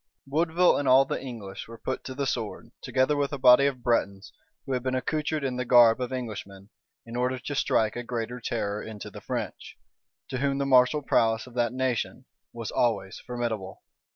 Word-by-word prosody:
Woodville 165 +5 +3
and 145 - -2
all 130 +1 +6
the - - -3
English 110 -7 -7
were 115 0 -10
put 130 +3 -4
to 130 - -6
the 140 0 -1
sword, 115 -5 -4
together 130 +3 +1
with 140 -1 0
a 140 - -3
body 130 +1 +7
of 130 -3 -4
Bretons, 100 -4 0 0.3
who 135 - -5
had 125 -1 0
been 130 +1 -1
accoutred 150 +3 -1
in 130 -2 -2
the 125 - -1
garb 120 -1 +6
of 125 - -3
Englishmen 105 -5 -6 0.3
in 115 0 -8
order 125 +1 0
to 135 +3 -5
strike 110 -5 +1
a 120 - -3
greater 120 0 -4
terror 105 -3 -2
into 110 -2 -8
the - - -10
French, - - -5 0.5
to 130 - -3
whom 140 0 0
the 140 - 0
martial 135 +2 +4
prowess 115 -3 +2
of 125 - -14
that 120 -1 +1
nation 130 -2 -2 0.3
was 115 -2 -6
always 100 -5 0
formidable. 115 -6 -4
125 Hz, 195 wpm, -27 LUFS, 115-135 Hz, 0.5 s, body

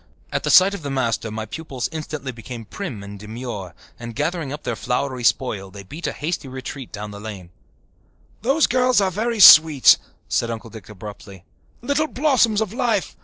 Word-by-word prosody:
At - - -1
sight 190 +2 +7
of 200 - -6
the 145 - -5
master 120 -4 -1
my 110 0 -5
pupils 135 0 -5
instantly 155 -4 -5
became 115 0 -9
prim 120 - -6
and 100 0 -9
demure 105 -5 -7 0.2
and, 120 -1 -8
gathering 155 0 -2
up 150 +1 -7
their 120 - -2
flowery 125 +1 -2
spoil, 105 -6 0
they 100 +1 -11
beat 150 - -6
a - - -1
hasty 155 -1 -4
retreat 130 0 -7
down 105 -1 -7
the 100 - -9
lane. 100 -5 -8 0.9
"Those 275 +7 +1
little 255 - 0
girls 250 -2 +4
are 195 -2 +1
very 225 +4 -2
sweet," 160 -7 +9 0.3
said 115 - 0
Uncle 115 -1 -6
Dick 110 -4 -12
abruptly. 100 -2 -10 0.4
"Little 285 +4 +1
blossoms 245 -8 +2
of 215 -2 -2
life! 230 - -1
130 Hz, 180 wpm, -22 LUFS, -, 0.9 s, sweet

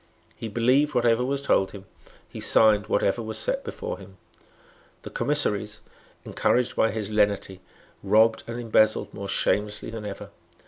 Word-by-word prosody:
He 115 - -6
believed 130 +7 +2
whatever 120 0 +2
was 140 +2 -2
told 95 -8 +1
him. 100 -2 -10 0.4
He - - -10
signed 105 -2 +4
whatever 100 +3 0
was 110 -1 -4
set - - -1
before 485 +1 -6
him. - - -14 0.9
The - - -9
commissaries, 105 -8 -1 0.4
encouraged 125 0 0
by 110 - +2
his 110 -2 -4
lenity, 100 -3 0 0.4
robbed 110 +3 +3
and 115 +1 -5
embezzled 110 -2 +1
more 100 0 -7
shamelessly 105 +2 -1
than 110 -2 -7
ever. 100 -1 -8
110 Hz, 145 wpm, -25 LUFS, 105-120 Hz, 0.9 s, signed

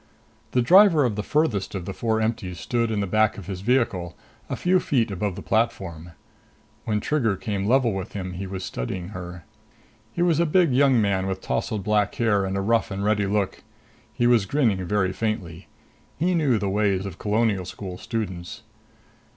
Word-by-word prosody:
The 125 - +3
driver 175 - +6
of 115 -4 -1
the 105 - -2
farthest 115 -8 0
of 90 -3 -4
the 95 - -5
four 110 +1 0
empties 110 -6 -2
stood 120 -1 -1
in 105 -2 -1
the - - 0
back 110 +2 +2
of 100 - -8
his 95 -2 -6
vehicle, 100 -7 0 0.3
a - - -2
few 185 +1 +2
feet 120 - 0
above 100 0 -2
the - - -8
platform. 95 -8 -1 0.7
When 105 -1 0
Trigger 115 -6 0
came 100 0 -3
level 125 -2 +3
with 95 +1 -5
him, 95 -2 -5
he 95 +2 -5
was 95 -1 -5
studying 85 +9 -4
her. 90 -3 -8 0.7
He 170 - -1
was 170 -3 +2
a 170 - +3
big 165 -3 +3
young 135 -1 +4
man 100 -3 +1
with 95 0 -2
tousled 105 +1 -2
black 105 -1 +1
hair 105 -4 +2
and 95 0 -2
a - - 0
rough 115 +3 +1
and 100 0 -4
ready 105 -1 +2
look. 100 -1 -1 0.5
He 120 +2 0
was 120 -5 +4
grinning 110 -8 +1
very 95 0 0
faintly. 95 -5 -4 0.5
He 175 +4 +1
knew 145 -9 +2
the 100 - -2
ways 100 -1 +1
of 95 -3 -7
Colonial 105 -2 +1
School 95 0 -7
students. 95 -6 -5
105 Hz, 190 wpm, -24 LUFS, 95-120 Hz, 0.7 s, driver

